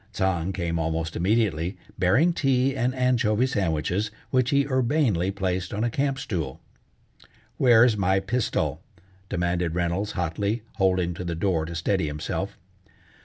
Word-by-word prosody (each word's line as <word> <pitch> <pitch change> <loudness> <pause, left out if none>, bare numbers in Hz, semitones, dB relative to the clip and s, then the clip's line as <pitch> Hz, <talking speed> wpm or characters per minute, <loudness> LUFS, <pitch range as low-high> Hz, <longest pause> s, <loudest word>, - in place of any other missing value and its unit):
Tsang 95 -2 0
came 85 -3 -2
almost 80 0 -2
immediately, 95 -2 +1 0.2
bearing 130 - +4
tea 135 -2 +1
and 130 0 0
anchovy 125 -3 +2
sandwiches, 95 - -1 0.2
which 130 -1 +2
he 140 -1 +3
urbanely 130 - +1
placed 95 -1 -2
on 105 - -1
a 120 - 0
camp 135 +2 0
stool. 85 - -4 1.0
"Where's 120 -2 +5
my 95 -1 +2
pistol?" 110 +5 -1 0.5
demanded 90 -2 -1
Reynolds 90 +4 -1
hotly, 100 +5 -2
holding 95 -3 +2
to 90 - -6
the 85 -1 -3
door 85 -2 0
to 85 +1 -6
steady 85 0 0
himself. 75 0 -4
95 Hz, 135 wpm, -25 LUFS, 85-120 Hz, 1.0 s, Where's